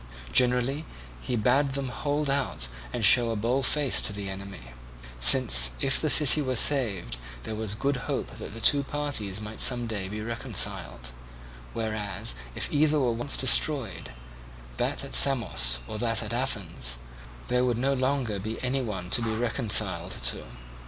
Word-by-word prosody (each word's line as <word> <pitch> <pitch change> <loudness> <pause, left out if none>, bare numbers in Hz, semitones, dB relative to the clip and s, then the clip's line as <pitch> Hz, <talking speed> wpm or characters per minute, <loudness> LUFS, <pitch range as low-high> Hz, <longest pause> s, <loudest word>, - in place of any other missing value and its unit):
Generally, 125 +4 +1 0.4
he 125 - -3
bade 135 +5 +1
them 135 -1 -4
hold 145 +3 -2
out 135 - -1 0.2
and - - -1
show 120 -2 +6
a 115 - -2
bold 120 +5 0
face 145 -4 +2
to - - +2
the 100 -1 -6
enemy, 95 -11 -9 0.5
since - - +6
if 135 - +1
the 155 - 0
city 150 0 +5
were 130 -2 -2
saved 105 - +2 0.3
there 110 - -6
was 110 -1 -3
good 140 +4 -1
hope - - -3
that 105 - -9
the - - -5
two 140 +5 +4
parties 135 -9 -4
might 105 +1 -6
some 120 -2 +5
day 105 -4 -4
be 105 +2 -6
reconciled, 60 - -3 0.6
whereas 110 -2 -2 0.2
if - - 0
either 150 0 +2
were 125 -3 +1
once 120 +4 +1
destroyed, 130 - +1 0.7
that - - -2
at - - -9
Samos, 70 - +3
or 105 - -6
that 115 -1 0
at - - -5
Athens, 95 - -2 0.5
there 125 0 +1
would 120 -2 0
no 135 +3 0
longer 130 -5 -1
be 110 +3 -5
any 130 +2 -1
one 95 -7 -6
to - - +5
be 110 -2 -2
reconciled 115 -1 0
to. - - -1
115 Hz, 165 wpm, -26 LUFS, 100-135 Hz, 0.7 s, show